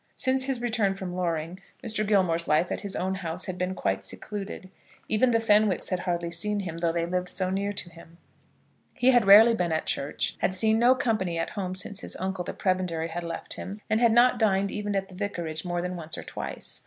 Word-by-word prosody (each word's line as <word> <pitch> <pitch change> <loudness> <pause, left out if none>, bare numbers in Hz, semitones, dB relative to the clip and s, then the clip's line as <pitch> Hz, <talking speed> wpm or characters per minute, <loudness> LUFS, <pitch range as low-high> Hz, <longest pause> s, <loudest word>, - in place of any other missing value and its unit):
Since 260 0 +2
his 265 -3 -1
return 225 -5 +1
from 185 -2 -6
Loring, 170 0 -2 0.3
Mr. 220 -1 +1
Gilmore's 180 -5 +2
life 155 +3 +2
at - - -2
his 200 -2 -3
own 190 +1 -1
house 180 -2 -4
had 185 - -4
been 180 +1 -1
quite 95 - -1
secluded. 195 - -7 0.4
Even 220 +4 +3
the 230 -1 +3
Fenwicks 210 -3 +2
had 185 - -1
hardly 170 -1 -2
seen 205 +4 -1
him, 170 -3 -5
though 170 -1 +1
they 170 0 -1
lived 180 +1 -1
so 185 -1 -1
near 200 +1 -1
to 185 - -3
him. 170 0 -15 0.8
He 255 +1 +4
had 245 -4 +4
rarely 220 +4 +9
been 180 -6 0
at 160 - -1
church, 140 +1 -2
had 185 - 0
seen 220 +3 +3
no 245 +2 +5
company 215 -9 -1
at 165 - -2
home 185 -3 -4
since 195 +1 -4
his - - -4
uncle, 190 -1 -3
the - - -4
prebendary, 180 -3 -1
had 170 +1 -4
left 165 -1 -4
him, 200 +3 -6
and 220 +2 +2
had 235 -2 +5
not 240 +1 +5
dined 200 -3 +2
even 205 -1 -3
at 195 0 -1
the 190 - -13
Vicarage 175 -5 -4
more 175 -1 -2
than 180 0 -3
once 160 -2 -5
or - - -6
twice. - - -6
190 Hz, 225 wpm, -27 LUFS, 170-210 Hz, 0.8 s, rarely